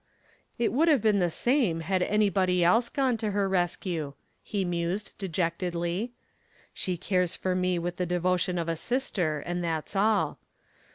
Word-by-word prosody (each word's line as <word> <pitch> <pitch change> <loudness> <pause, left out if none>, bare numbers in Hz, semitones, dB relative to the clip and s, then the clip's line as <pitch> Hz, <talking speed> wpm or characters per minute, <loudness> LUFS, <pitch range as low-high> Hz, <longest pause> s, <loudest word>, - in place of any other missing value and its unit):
"It 235 -2 +1
would 310 +7 +3
have 290 -9 +4
been 210 -2 +4
the 175 -2 +2
same 225 - +1
had 185 +3 0
anybody 190 -3 +2
else 225 +8 +4
gone 260 -4 +1
to 220 -1 -2
her 200 -1 +1
rescue," 175 -5 -1 0.3
he 200 -3 -2
mused 175 +4 -2
dejectedly. 175 +3 -2 0.6
"She 180 -2 -2
cares 180 0 0
for 185 - -1
me 180 -1 +1
with 175 +1 -3
the 180 - -1
devotion 180 +1 +1
of 170 -1 -2
a 165 - 0
sister 180 - -1
and 175 0 -2
that's 165 +2 -3
all. 210 +1 +2
180 Hz, 160 wpm, -28 LUFS, 175-210 Hz, 0.6 s, have